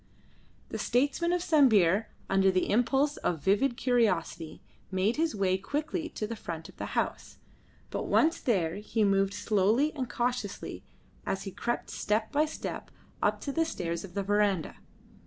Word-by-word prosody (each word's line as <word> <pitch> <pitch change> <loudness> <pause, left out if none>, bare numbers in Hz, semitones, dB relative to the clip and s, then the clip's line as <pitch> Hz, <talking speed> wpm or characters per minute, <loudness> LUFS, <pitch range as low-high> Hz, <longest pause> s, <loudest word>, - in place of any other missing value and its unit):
The - - -4
statesman 285 +8 +1
of 355 0 0
Sambir, 225 - +4 0.2
under 195 0 +3
the 185 -1 +1
impulse 270 +6 +2
of 170 - -1
vivid 235 - +2
curiosity, 190 -11 0 0.3
made 195 +6 +1
his 320 -6 +1
way 190 -2 +1
quickly 310 - -3
to 215 - -4
the 230 +2 -5
front 165 -6 -6
of - - -16
the - - -5
house, - - -2 0.5
but - - -3
once 325 +1 +3
there 180 -9 0
he 215 +1 -1
moved 195 0 +2
slowly 220 +8 +2
and 260 -5 -4
cautiously 245 -4 -3 0.4
as 190 - -2
he 195 - -6
crept 240 +5 -3
step 215 +1 -1
by 300 +1 +3
step 315 - -6 0.3
up - - +2
the 300 +3 0
stairs 170 - -3
of 180 -3 -11
the 200 - 0
verandah. 205 -3 +1
215 Hz, 155 wpm, -29 LUFS, 190-275 Hz, 0.5 s, Sambir